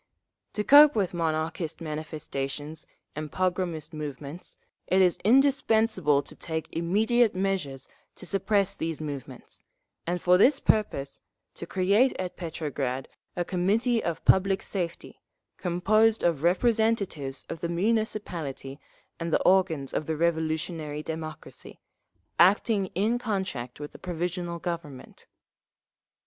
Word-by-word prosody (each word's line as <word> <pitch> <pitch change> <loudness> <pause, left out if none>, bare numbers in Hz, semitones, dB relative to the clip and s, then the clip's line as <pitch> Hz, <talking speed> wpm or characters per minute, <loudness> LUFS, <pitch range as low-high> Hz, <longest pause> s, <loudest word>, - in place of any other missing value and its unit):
To 210 - -1
cope 290 +4 +8
with 195 -5 0
Monarchist 160 -1 -2
manifestations 150 -1 -5 0.3
and 155 0 -5
pogromist 180 -4 -2
movements, 150 +2 -7 0.3
it 190 - +3
is 180 -2 +3
indispensable 220 - +3
to - - -10
take 160 -1 -4
immediate 215 +7 +2
measures 185 -9 -2 0.3
to - - -10
suppress 200 +1 +1
these 160 -1 -3
movements, 145 -4 -7 0.5
and 175 +1 -1
for 180 +1 +4
this 265 +6 +5
purpose 140 -11 0 0.3
to 170 - -8
create 200 +9 +3
at 185 -1 -4
Petrograd 145 -6 -4 0.3
a 175 - -1
Committee 215 +7 +1
of 170 -2 -3
Public 195 0 +4
Safety, 175 -4 -5 0.4
composed 215 +5 +2
of 165 -5 +1
representatives 195 - +1
of 165 - -6
the 170 - -2
Municipality 170 -8 -2 0.4
and 165 0 -3
the - - +2
organs 175 -7 +2
of 155 - -2
the 160 -1 -1
revolutionary 160 -2 -1
democracy, 160 0 -8 0.6
acting 195 +2 +4
in 220 +6 +1
contact 190 - -3
with 145 0 -7
the - - -13
Provisional 175 0 -3
Government…. 165 -6 -7
175 Hz, 120 wpm, -27 LUFS, 155-200 Hz, 0.6 s, cope